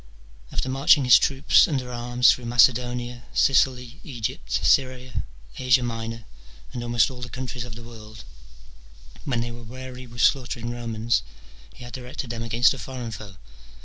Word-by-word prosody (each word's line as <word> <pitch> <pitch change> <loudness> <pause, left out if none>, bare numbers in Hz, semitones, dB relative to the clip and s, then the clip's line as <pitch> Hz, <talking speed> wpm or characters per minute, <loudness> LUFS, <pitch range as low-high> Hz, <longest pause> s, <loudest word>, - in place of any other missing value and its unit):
after - - -2
marching 135 +2 +4
his 125 - +8
troops 135 0 +4
under 130 -5 -3
arms 120 +1 +3
through 125 - -3
Macedonia, 120 0 +2
Sicily, 125 0 +2
Egypt, 115 - -5
Syria, 130 - +1 0.3
Asia 130 -1 +3
Minor, 115 -1 -5 0.5
and 120 - -4
almost 120 0 +2
all 125 -1 -10
the 125 - -6
countries 125 -1 -5
of 120 -2 -9
the 120 - -10
world, 110 -2 -12 1.0
when 125 -5 -1
they 120 0 -4
were 120 0 -10
weary 130 +2 -9
with 120 0 -6
slaughtering 120 -3 +1
Romans 115 -1 -1 0.5
he - - -12
had 120 - -10
directed 125 -1 -6
them 115 -1 -5
against 115 +2 +3
a 135 - -9
foreign 120 +1 -6
foe. 105 -3 -9
120 Hz, 155 wpm, -24 LUFS, 115-130 Hz, 1.0 s, his